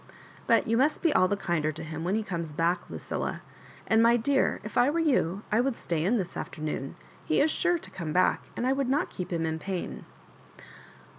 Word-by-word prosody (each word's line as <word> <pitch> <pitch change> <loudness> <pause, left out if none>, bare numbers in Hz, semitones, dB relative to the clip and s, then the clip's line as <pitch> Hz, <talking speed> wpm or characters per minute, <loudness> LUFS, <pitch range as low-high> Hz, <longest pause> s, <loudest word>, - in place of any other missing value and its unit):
" - - -22
But 230 -1 +4
you 230 +1 +2
must 290 +5 +2
be 330 -3 +3
all 185 -8 +4
the 200 +2 0
kinder 160 -5 0
to 160 +2 -8
him 160 0 -5
when 185 +4 0
he 220 - 0
comes 170 -6 -4
back, 170 +3 0
Lucilla. - - -4 0.4
And, 220 0 +4
my 235 +1 +5
dear, 270 +4 +1
if 215 - -8
I 245 - +5
were 310 - -1
you, 235 - +1
I 215 +3 +4
would 265 -1 -1
stay 165 -2 -2
in 215 +8 +2
this 185 -5 -4
afternoon. 150 -3 -4 0.3
He 155 - +1
is 310 - +3
sure 350 +1 +2
to - - -11
come 165 -4 -5
back, 185 +3 +2
and 240 - -1
I 260 - +3
would 270 -2 -1
not 285 +3 +1
keep 180 - -6
him 165 -1 0
in 160 0 -2
pain." 185 +2 -5
'*! - - -25
195 Hz, 230 wpm, -28 LUFS, 165-250 Hz, 0.4 s, my